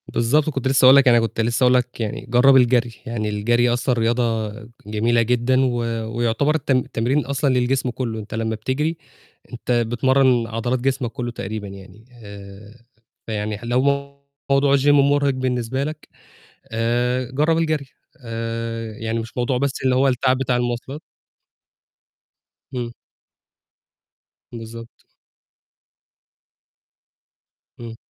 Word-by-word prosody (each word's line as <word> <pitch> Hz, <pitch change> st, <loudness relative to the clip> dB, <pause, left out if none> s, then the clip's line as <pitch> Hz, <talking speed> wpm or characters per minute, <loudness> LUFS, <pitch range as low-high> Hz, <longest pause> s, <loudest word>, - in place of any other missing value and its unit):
بالضبط، 145 Hz, +7 st, +1 dB
كنت 135 Hz, -3 st, -2 dB
لسه 130 Hz, -1 st, +4 dB
هاقول 130 Hz, +1 st, +9 dB
لك، 140 Hz, -1 st, +5 dB
أنا 120 Hz, -1 st, +6 dB
كنت 115 Hz, 0 st, -2 dB
لسه 120 Hz, +2 st, 0 dB
هاقول 125 Hz, 0 st, +5 dB
لك 125 Hz, -1 st, 0 dB
يعني 110 Hz, -2 st, -4 dB
جرّب 125 Hz, +3 st, +5 dB
الجري، 120 Hz, -2 st, +3 dB
يعني 110 Hz, -2 st, -3 dB
الجري 120 Hz, +4 st, +1 dB
أصلًا 125 Hz, +1 st, 0 dB
رياضة 115 Hz, -2 st, 0 dB, 0.3 s
جميلة 115 Hz, +3 st, +1 dB
جدًا 125 Hz, +2 st, +1 dB
و 125 Hz, -2 st, 0 dB, 0.4 s
ويُعتبر 120 Hz, +6 st, +1 dB
الت 150 Hz, -3 st, -2 dB
التمرين 130 Hz, +2 st, 0 dB
أصلًا 140 Hz, -1 st, 0 dB
للجسم 125 Hz, +1 st, +1 dB
كله، 120 Hz, -3 st, -4 dB
أنت 105 Hz, -1 st, -9 dB
لمّا 110 Hz, 0 st, -2 dB
بتجري، 145 Hz, +9 st, -2 dB, 0.6 s
أنت 120 Hz, +1 st, -5 dB
بتمرن 120 Hz, +1 st, +2 dB
عضلات 115 Hz, +3 st, -2 dB
جسمك 130 Hz, -2 st, -1 dB
كله 120 Hz, 0 st, -4 dB
تقريبًا 105 Hz, -2 st, -6 dB
يعني، 100 Hz, +2 st, -13 dB, 0.2 s
آآ، 100 Hz, +3 st, -12 dB, 0.4 s
فيعني 105 Hz, -1 st, -3 dB
لو 120 Hz, +2 st, +1 dB, 0.7 s
موضوع 140 Hz, 0 st, +4 dB
الGym 140 Hz, +1 st, -1 dB
مرهق 140 Hz, 0 st, +3 dB
بالنسبة 130 Hz, 0 st, -2 dB
لك، 155 Hz, +1 st, -7 dB, 0.6 s
آآ، 120 Hz, +2 st, 0 dB
جرّب 155 Hz, +5 st, +1 dB
الجري 155 Hz, -4 st, -1 dB, 0.4 s
آآ، 115 Hz, 0 st, -4 dB
يعني 110 Hz, +1 st, -3 dB
مش 115 Hz, 0 st, -7 dB
موضوع 125 Hz, +1 st, 0 dB
بس 140 Hz, +1 st, 0 dB
اللي 130 Hz, -1 st, +3 dB
هو 135 Hz, +2 st, +3 dB
التعب 130 Hz, 0 st, +1 dB
بتاع 130 Hz, -2 st, 0 dB
المواصلات 120 Hz, +4 st, -3 dB, 1.7 s
امم. 120 Hz, -2 st, -4 dB, 1.6 s
بالضبط. 115 Hz, 0 st, -10 dB, 2.8 s
إمم. 115 Hz, -1 st, -8 dB
120 Hz, 130 wpm, -21 LUFS, 115-130 Hz, 2.8 s, هاقول